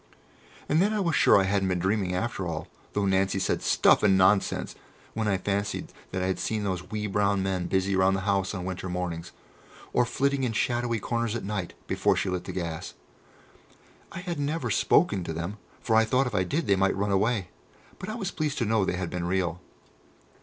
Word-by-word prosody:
And 155 Hz, +3 st, +3 dB
then 205 Hz, +3 st, +2 dB
I -, -, 0 dB
was 170 Hz, -5 st, +1 dB
sure -, -, +6 dB
that -, -, +5 dB
I -, -, -1 dB
hadn't 100 Hz, -1 st, +1 dB
been 90 Hz, -1 st, +1 dB
dreaming 95 Hz, 0 st, 0 dB
after 95 Hz, -2 st, -2 dB
all, 80 Hz, -1 st, -4 dB, 0.3 s
though 105 Hz, -1 st, 0 dB
Nancy 95 Hz, 0 st, +2 dB
said, 95 Hz, -, 0 dB
"Stuff -, -, +4 dB
and 95 Hz, -3 st, +4 dB
Nonsense," 95 Hz, +2 st, +2 dB, 0.4 s
when 110 Hz, -1 st, -1 dB
I 100 Hz, -2 st, +2 dB
fancied 100 Hz, +2 st, -2 dB, 0.2 s
that 95 Hz, 0 st, -2 dB
I -, -, 0 dB
had 95 Hz, 0 st, -1 dB
seen 110 Hz, -1 st, -1 dB
those 90 Hz, -2 st, -3 dB
wee 105 Hz, 0 st, -3 dB
brown 100 Hz, -1 st, +1 dB
men 95 Hz, -2 st, -1 dB
busy 95 Hz, +1 st, +1 dB
about 95 Hz, 0 st, +3 dB
the 95 Hz, -, -2 dB
house 100 Hz, 0 st, 0 dB
on 90 Hz, -1 st, -4 dB
winter 95 Hz, 0 st, -4 dB
mornings, 90 Hz, -1 st, -4 dB, 0.6 s
or 125 Hz, -, +4 dB
flitting 140 Hz, +3 st, 0 dB
in 120 Hz, -3 st, 0 dB
shadowy 120 Hz, 0 st, 0 dB
corners 115 Hz, +1 st, -1 dB
at 120 Hz, -, -4 dB
night, 100 Hz, -4 st, -4 dB
before -, -, +1 dB
she 95 Hz, -, -1 dB
lit 90 Hz, -1 st, -3 dB
the -, -, -5 dB
gas. 85 Hz, -3 st, -5 dB, 1.2 s
I 170 Hz, -, -6 dB
had 175 Hz, -4 st, -4 dB
never 150 Hz, +3 st, -1 dB
spoken 100 Hz, -, +3 dB
to 80 Hz, -, -4 dB
them, 85 Hz, +6 st, -4 dB, 0.2 s
for 110 Hz, -, +1 dB
I 110 Hz, -, +6 dB
thought 125 Hz, +5 st, +2 dB
if 125 Hz, -, -4 dB
I 95 Hz, -2 st, +1 dB
did 155 Hz, -, -1 dB
they 100 Hz, -, +3 dB
might 95 Hz, 0 st, +2 dB
run 100 Hz, +1 st, 0 dB
away; 100 Hz, -1 st, +1 dB, 0.5 s
but 185 Hz, -, -6 dB
I 215 Hz, -, -3 dB
was 200 Hz, -6 st, -3 dB
pleased 150 Hz, -2 st, -2 dB
to 120 Hz, -, 0 dB
know 110 Hz, -1 st, +2 dB
they 90 Hz, -, -1 dB
had 90 Hz, -2 st, -3 dB
been 90 Hz, -1 st, -3 dB
real. 90 Hz, -1 st, -1 dB
100 Hz, 215 wpm, -27 LUFS, 95-115 Hz, 1.2 s, sure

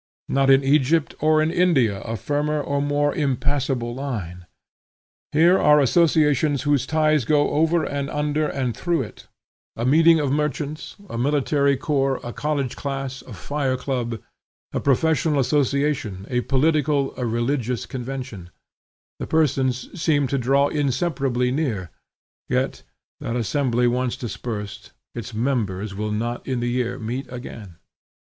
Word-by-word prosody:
Not 135 Hz, 0 st, +2 dB
in 135 Hz, 0 st, +6 dB
Egypt 145 Hz, +3 st, +2 dB
or 155 Hz, 0 st, +3 dB
in 160 Hz, -, 0 dB
India 135 Hz, -, +2 dB
a 115 Hz, 0 st, -4 dB
firmer 150 Hz, +6 st, -1 dB
or 140 Hz, -1 st, -1 dB
more 145 Hz, 0 st, +1 dB
impassable 135 Hz, -3 st, -1 dB
line. 100 Hz, -10 st, -5 dB, 0.8 s
Here 170 Hz, +5 st, +5 dB
are 150 Hz, 0 st, +5 dB
associations 150 Hz, -2 st, +3 dB
whose 145 Hz, -3 st, +1 dB
ties 155 Hz, -2 st, +2 dB
go 145 Hz, +4 st, +2 dB
over 160 Hz, +2 st, +2 dB
and 140 Hz, -1 st, -3 dB
under 150 Hz, +1 st, 0 dB
and 130 Hz, -5 st, -2 dB
through 170 Hz, -5 st, 0 dB
it, 105 Hz, -, -12 dB, 0.5 s
a 115 Hz, -, -3 dB
meeting 160 Hz, +4 st, +5 dB
of 145 Hz, -3 st, 0 dB
merchants, 150 Hz, +1 st, -2 dB
a 115 Hz, -, -5 dB
military 140 Hz, +1 st, +2 dB
corps, 135 Hz, -2 st, 0 dB
a 120 Hz, -, -6 dB
college 145 Hz, -4 st, -2 dB
class, 135 Hz, -1 st, -4 dB
a 125 Hz, -, -11 dB
fire 130 Hz, +6 st, -2 dB
club, 125 Hz, -3 st, -3 dB, 0.5 s
a -, -, 0 dB
professional 155 Hz, +2 st, +2 dB
association, 140 Hz, -6 st, 0 dB
a 125 Hz, 0 st, +1 dB
political, 145 Hz, +1 st, +1 dB
a 125 Hz, -, -2 dB
religious 120 Hz, +1 st, -1 dB
convention; 125 Hz, -, -6 dB, 0.7 s
the -, -, -4 dB
persons 135 Hz, -1 st, 0 dB
seem 145 Hz, -4 st, +2 dB
to 140 Hz, -, 0 dB
draw 135 Hz, +3 st, +3 dB
inseparably 135 Hz, -3 st, 0 dB
near; 115 Hz, -, -2 dB, 0.6 s
yet, -, -, -1 dB, 0.4 s
that 115 Hz, -, -4 dB
assembly 125 Hz, +1 st, +1 dB
once 125 Hz, 0 st, 0 dB
dispersed, 105 Hz, -4 st, -6 dB, 0.2 s
its 115 Hz, -1 st, -7 dB
members 110 Hz, -5 st, -1 dB
will 105 Hz, +2 st, -3 dB
not 120 Hz, +3 st, -3 dB
in 130 Hz, -2 st, -1 dB
the 120 Hz, 0 st, -1 dB
year 125 Hz, 0 st, -1 dB
meet 125 Hz, +3 st, -5 dB
again. 115 Hz, -7 st, -8 dB
135 Hz, 140 wpm, -23 LUFS, 120-150 Hz, 0.8 s, in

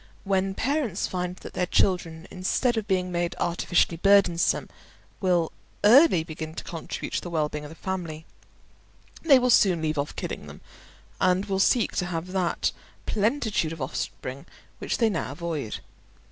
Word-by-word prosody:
When 195 Hz, -1 st, 0 dB
parents 260 Hz, -, 0 dB
find 180 Hz, -1 st, -3 dB
that -, -, -11 dB
their 180 Hz, -1 st, -1 dB
children, 175 Hz, -3 st, +1 dB
instead 235 Hz, +7 st, 0 dB
of 220 Hz, -2 st, -2 dB
being 185 Hz, -2 st, 0 dB
made 175 Hz, 0 st, -1 dB
artificially 175 Hz, 0 st, +1 dB
burdensome, 195 Hz, -2 st, +3 dB, 0.5 s
will 175 Hz, -4 st, +2 dB, 0.3 s
early 235 Hz, -, +7 dB
begin 160 Hz, -1 st, -7 dB
to -, -, -5 dB
contribute 165 Hz, -2 st, -6 dB
to -, -, 0 dB
the 175 Hz, -, -6 dB
well 155 Hz, -3 st, 0 dB
being 150 Hz, 0 st, -6 dB
of -, -, -8 dB
the 160 Hz, -, -11 dB
family, 165 Hz, -4 st, -5 dB, 1.0 s
they 290 Hz, -5 st, +6 dB
will 250 Hz, 0 st, +2 dB
soon 185 Hz, -6 st, +5 dB
leave 155 Hz, -2 st, -1 dB
off 140 Hz, -, -3 dB
killing -, -, -5 dB
them, -, -, -11 dB, 0.6 s
and 185 Hz, +2 st, +2 dB
will 195 Hz, -2 st, -1 dB
seek 230 Hz, +3 st, +3 dB
to 180 Hz, -, 0 dB
have 175 Hz, +1 st, -4 dB
that 185 Hz, -2 st, 0 dB, 0.3 s
plenitude 215 Hz, -, 0 dB
of 165 Hz, -, -9 dB
offspring 130 Hz, 0 st, -5 dB, 0.3 s
which -, -, -2 dB
they 230 Hz, -, +3 dB
now 165 Hz, -9 st, -2 dB
avoid. 155 Hz, -7 st, -4 dB
180 Hz, 160 wpm, -26 LUFS, 165-200 Hz, 1.0 s, early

